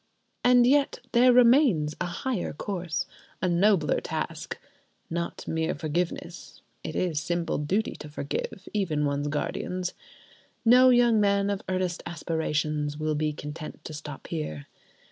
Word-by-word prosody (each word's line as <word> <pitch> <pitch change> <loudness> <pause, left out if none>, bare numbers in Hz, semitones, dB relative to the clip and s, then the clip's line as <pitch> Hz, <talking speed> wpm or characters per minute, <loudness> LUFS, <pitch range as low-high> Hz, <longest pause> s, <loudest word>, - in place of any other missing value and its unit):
And 245 -1 +6
yet 280 +2 +3
there 250 +2 +6
remains 240 - +5
a 180 - 0
higher 215 +3 -3
course, 175 -1 -3 0.3
a 185 - 0
nobler 180 -1 +3
task. - - -4 0.5
Not 170 0 -4
mere 160 0 -1
forgiveness: 170 +3 -4 0.2
it - - -5
is 170 -5 0
simple 170 -1 -1
duty 190 +9 0
to 150 - -9
forgive—even 155 +2 -2
one's 140 0 -1
guardians. 180 +4 -2 0.7
No 250 +2 +7
young 240 -3 +5
man 200 0 +2
of 200 - -2
earnest 185 -2 -1
aspirations 155 -3 -1
will 155 0 -1
be 155 0 0
content 150 +1 -8
to 155 - -6
stop 150 -2 -8
there. 75 - -4
170 Hz, 130 wpm, -27 LUFS, 150-205 Hz, 0.7 s, No